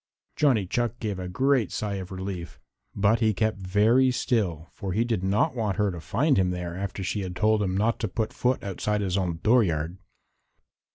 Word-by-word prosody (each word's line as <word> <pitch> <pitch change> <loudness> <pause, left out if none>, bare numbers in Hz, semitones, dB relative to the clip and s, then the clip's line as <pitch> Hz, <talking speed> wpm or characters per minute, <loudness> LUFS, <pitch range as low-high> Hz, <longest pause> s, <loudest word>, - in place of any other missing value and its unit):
Johnny 125 -10 +3
Chuck 120 +4 -1
gave 105 -4 -3
a 90 -1 -5
great 130 +2 +2
sigh 105 -2 -2
of 95 -1 -7
relief, 95 -2 -6 0.4
but 100 +3 +3
he 110 -3 +2
kept 110 0 0
very 105 +7 +3
still 100 - -1
for 95 -2 -4
he 110 +4 +2
did 115 -6 -1
not 105 +11 +1
want 105 -5 -1
her 105 -2 +2
to 85 -2 -7
find 135 - +1
him 95 -1 +3
there 90 -1 -4
after 95 0 -4
she 100 +2 -2
had 90 -1 -5
told 105 +3 +2
him 95 -2 0
not 115 +3 +1
to 110 - -1
put 110 +3 -3
foot 125 +1 0
outside 105 +2 -1
his 95 -2 -1
own 90 -4 -1
dooryard. 90 -7 +2
100 Hz, 195 wpm, -26 LUFS, 95-115 Hz, 0.4 s, Johnny